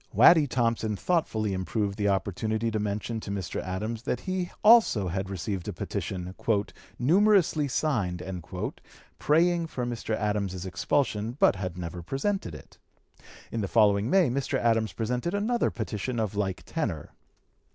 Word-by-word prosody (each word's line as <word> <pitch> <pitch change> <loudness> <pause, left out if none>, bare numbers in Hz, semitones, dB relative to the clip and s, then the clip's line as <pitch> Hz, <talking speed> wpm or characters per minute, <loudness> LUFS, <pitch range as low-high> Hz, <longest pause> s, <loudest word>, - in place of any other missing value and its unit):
Waddy 160 -4 +7
Thompson 115 -3 0
thoughtfully 110 - 0
improved 100 +2 -2
the 100 -1 0
opportunity 110 +4 0
to 110 - -1
mention 105 +2 -2
to 110 - -8
Mr. 100 -3 -3
Adams 105 +5 -4
that 125 +1 -2
he 185 -2 -2
also 210 - +6
had 95 +2 -3
received 95 0 -4
a - - -3
petition, 90 -1 -4 0.6
"numerously 175 - +3
signed," 115 - 0 1.0
praying 170 +2 +3
for 125 -6 -4
Mr. 115 -2 -2
Adams's 100 -4 -2
expulsion, 105 +4 0
but - - +5
had 90 -2 -5
never 90 0 -5
presented 135 - -2
it. 75 - -14 0.7
In 115 - -2
the 100 - -1
following 105 0 +3
May 180 -6 +4
Mr. 140 +2 -1
Adams 115 -2 +1
presented 125 - -2
another 225 +4 +1
petition 115 +2 -3
of 110 -3 -1
like 95 -2 -2
tenor. 110 - -3
110 Hz, 140 wpm, -27 LUFS, 95-140 Hz, 1.0 s, Waddy